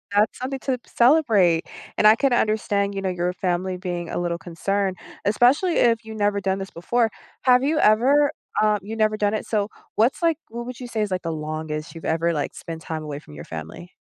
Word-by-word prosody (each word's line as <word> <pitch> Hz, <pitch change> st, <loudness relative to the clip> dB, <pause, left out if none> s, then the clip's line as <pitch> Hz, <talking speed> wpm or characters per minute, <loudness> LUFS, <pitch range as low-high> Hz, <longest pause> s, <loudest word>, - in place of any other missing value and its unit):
that's 210 Hz, +1 st, +3 dB
something 265 Hz, +1 st, -3 dB
to 265 Hz, -2 st, -1 dB
celebrate, 225 Hz, -, +4 dB, 0.3 s
and 210 Hz, -, +6 dB
I 215 Hz, -, +8 dB
can 275 Hz, +3 st, +1 dB
understand, 205 Hz, -3 st, +1 dB
you 195 Hz, -, -2 dB
know, 190 Hz, -, -1 dB
your 180 Hz, 0 st, -1 dB
family 185 Hz, 0 st, -1 dB
being 175 Hz, -2 st, -4 dB
a -, -, -2 dB
little 175 Hz, -1 st, -1 dB
concerned, 190 Hz, +3 st, -2 dB, 0.3 s
especially 255 Hz, -, +3 dB
if 230 Hz, -1 st, +3 dB
you 220 Hz, 0 st, -8 dB
never 205 Hz, -1 st, +1 dB
done 190 Hz, 0 st, 0 dB
this 195 Hz, 0 st, -5 dB
before. 225 Hz, +7 st, 0 dB, 0.3 s
Have 250 Hz, 0 st, +5 dB
you 305 Hz, +3 st, +1 dB
ever, 275 Hz, +7 st, +4 dB, 0.3 s
um, 215 Hz, -1 st, +3 dB
you 215 Hz, +3 st, -6 dB
never 215 Hz, -1 st, +1 dB
done 205 Hz, 0 st, +1 dB
it? -, -, -3 dB
So 210 Hz, -2 st, 0 dB, 0.3 s
what's, 230 Hz, +9 st, +2 dB
like 330 Hz, -3 st, +2 dB
what 235 Hz, +1 st, -6 dB
would 250 Hz, -1 st, -7 dB
you 250 Hz, -, -6 dB
say 230 Hz, -2 st, -2 dB
is, 210 Hz, -2 st, -1 dB
like, 185 Hz, 0 st, -2 dB
the 165 Hz, -, -2 dB
longest 155 Hz, 0 st, -5 dB
you've 165 Hz, -, -9 dB
ever, 165 Hz, +1 st, +1 dB
like, 150 Hz, -2 st, -2 dB
spent 165 Hz, -1 st, -7 dB
time 160 Hz, -1 st, -5 dB
away 145 Hz, -2 st, -5 dB
from 75 Hz, -, -15 dB
your 75 Hz, -, -8 dB
family? 80 Hz, -, -8 dB
205 Hz, 220 wpm, -23 LUFS, 175-235 Hz, 0.3 s, I